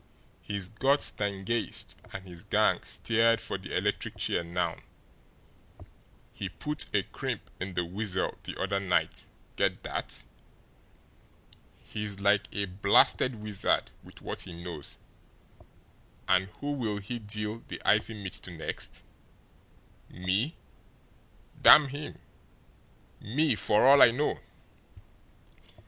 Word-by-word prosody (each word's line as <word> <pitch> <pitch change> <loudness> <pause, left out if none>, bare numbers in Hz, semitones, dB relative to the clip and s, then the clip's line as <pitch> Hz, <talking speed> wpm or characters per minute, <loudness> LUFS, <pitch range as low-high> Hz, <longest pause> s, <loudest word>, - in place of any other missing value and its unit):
He's 100 -3 -3
got 135 +7 +2
Stangeist 100 +2 -2 0.2
and 95 -1 -7
his 85 -2 -10
gang - - +2
steered 115 0 +2
for 100 - -4
the 95 - -3
electric 100 +3 -1
chair - - 0
now; 85 0 -1 1.6
he 95 - -4
put 150 +10 -1
a - - +2
crimp - - -5
in 90 0 -5
the 90 - +1
Weasel 95 +1 -2
the - - -7
other 100 - 0
night 95 -2 0 0.3
get - - +1
that? - - -4 1.6
He's 105 -2 -5
like 100 0 +3
a 100 -1 -1
blasted 100 +6 +4
wizard 105 -2 0
with - - -15
what - - -4
he 90 - -6
knows. 85 -3 -6 1.3
And 95 +1 +3
who'll 130 -8 -2
he 105 +4 -5
deal 105 +1 -4
the - - -6
icy 110 +1 +3
mitt 100 -3 -6
to - - -6
next? 80 -3 -6 1.1
Me 95 - -1 1.1
damn 145 -2 +9
him 145 +2 -7 1.0
me, 145 +8 +1
for 105 0 +3
all 140 +1 +8
I - - +10
know!" 135 +6 0
105 Hz, 115 wpm, -29 LUFS, 95-115 Hz, 1.6 s, I